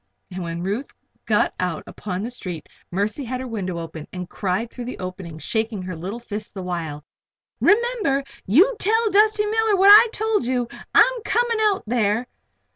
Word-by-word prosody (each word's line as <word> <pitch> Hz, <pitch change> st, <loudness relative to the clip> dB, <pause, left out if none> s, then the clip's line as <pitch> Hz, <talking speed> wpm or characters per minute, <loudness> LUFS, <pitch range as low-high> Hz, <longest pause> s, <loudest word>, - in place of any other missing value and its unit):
And 185 Hz, +1 st, -5 dB
when 170 Hz, 0 st, -4 dB
Ruth 210 Hz, +9 st, -2 dB, 0.4 s
got -, -, +2 dB
out -, -, -2 dB
upon 185 Hz, -1 st, -5 dB
the 235 Hz, -, -4 dB
street 180 Hz, -9 st, -7 dB, 0.2 s
Mercy 205 Hz, +9 st, -2 dB
had 255 Hz, +1 st, -4 dB
her 260 Hz, -, -5 dB
window 190 Hz, -7 st, -4 dB
open 165 Hz, -2 st, -7 dB
and 180 Hz, -1 st, -6 dB
cried 195 Hz, +5 st, -2 dB
through 245 Hz, -, -7 dB
the 250 Hz, -, -6 dB
opening, 180 Hz, -3 st, -7 dB
shaking 220 Hz, +3 st, -2 dB
her 185 Hz, -1 st, -5 dB
little 190 Hz, +8 st, -5 dB
fist 210 Hz, -3 st, -7 dB
the 190 Hz, -, -5 dB
while: 160 Hz, -5 st, -4 dB, 0.5 s
"Remember! 425 Hz, -, +2 dB, 0.2 s
You 360 Hz, -, +5 dB
tell 445 Hz, +1 st, +2 dB
Dusty 420 Hz, +1 st, +4 dB
Miller 440 Hz, 0 st, +2 dB
what 390 Hz, +1 st, +6 dB
I 430 Hz, +3 st, +10 dB
told 440 Hz, -, 0 dB
you! 250 Hz, -1 st, 0 dB, 0.3 s
I'm -, -, +5 dB
coming 470 Hz, 0 st, +1 dB
out 420 Hz, -3 st, +2 dB
there." 225 Hz, 0 st, +1 dB
230 Hz, 175 wpm, -22 LUFS, -, 0.5 s, I